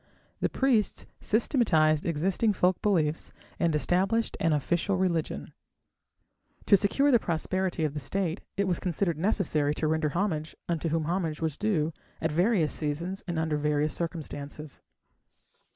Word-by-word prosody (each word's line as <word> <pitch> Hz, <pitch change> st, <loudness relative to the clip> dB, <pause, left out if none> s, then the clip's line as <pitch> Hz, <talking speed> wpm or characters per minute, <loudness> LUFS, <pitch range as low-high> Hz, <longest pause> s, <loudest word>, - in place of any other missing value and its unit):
The -, -, +1 dB
priests 250 Hz, -6 st, +1 dB
systematized 170 Hz, -, +2 dB
existing 185 Hz, +7 st, +1 dB
folk 180 Hz, -1 st, +1 dB
beliefs 165 Hz, -7 st, +1 dB, 0.3 s
and 165 Hz, -3 st, +2 dB
established 190 Hz, -, +1 dB
an 165 Hz, -, +2 dB
official 170 Hz, +6 st, +1 dB
religion. 175 Hz, -4 st, -1 dB, 1.1 s
To 200 Hz, -, +7 dB
secure 275 Hz, +9 st, +3 dB
the 240 Hz, -, +6 dB
prosperity 180 Hz, 0 st, -1 dB
of 150 Hz, -2 st, 0 dB
the 150 Hz, -, -3 dB
State, 180 Hz, +2 st, -2 dB, 0.2 s
it 200 Hz, -1 st, +1 dB
was 180 Hz, -, 0 dB
considered 170 Hz, -2 st, -1 dB
necessary 160 Hz, -6 st, +1 dB
to 155 Hz, -, -1 dB
render 160 Hz, 0 st, +1 dB
homage 160 Hz, -2 st, -2 dB
unto 165 Hz, -1 st, -1 dB
whom 160 Hz, 0 st, 0 dB
homage 165 Hz, -1 st, -1 dB
was 160 Hz, -3 st, -1 dB
due 165 Hz, -5 st, 0 dB, 0.3 s
at 160 Hz, -, -1 dB
various 175 Hz, 0 st, +2 dB
seasons 165 Hz, +6 st, -2 dB
and 170 Hz, -2 st, -2 dB
under 160 Hz, -1 st, 0 dB
various 150 Hz, 0 st, +1 dB
circumstances. 150 Hz, -3 st, -5 dB
170 Hz, 140 wpm, -28 LUFS, 155-195 Hz, 1.1 s, To